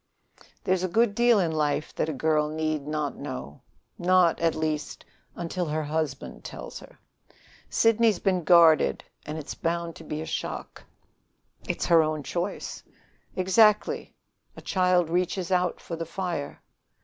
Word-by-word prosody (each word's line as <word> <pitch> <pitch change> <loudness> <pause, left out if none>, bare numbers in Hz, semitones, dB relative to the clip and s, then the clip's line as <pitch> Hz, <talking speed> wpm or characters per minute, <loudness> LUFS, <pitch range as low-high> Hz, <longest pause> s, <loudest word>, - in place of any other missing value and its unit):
"There's 185 -1 +1
a 185 - 0
good 220 +4 +2
deal 235 +1 +4
in 170 -4 +1
life 150 -1 -1
that 160 - -1
a - - 0
girl 150 +1 +1
need 155 -2 -2
not 150 -2 -2
know 70 +3 -7 0.4
not, 180 -1 +4
at 165 -1 +1
least, 155 -1 -3 0.3
until 175 +1 -3
her 155 +1 -1
husband 150 -2 -3
tells - - -8
her. - - -16 0.7
Sidney's 225 -2 +3
been 185 -2 0
guarded, 160 - +5 0.2
and 150 +1 -4
it's 155 -1 -6
bound 170 -1 -2
to - - -11
be 150 - -5
a 160 - -4
shock." - - -5 0.9
"It's - - -1
her 165 -1 +6
own 155 -1 -1
choice." 180 +7 -4 0.5
"Exactly. 210 +3 +3 0.4
A - - -9
child 180 -2 +2
reaches 180 +1 -1
out 180 -1 +1
for 165 - -6
the 165 0 -5
fire." 170 -4 -4
165 Hz, 150 wpm, -26 LUFS, 155-185 Hz, 0.9 s, her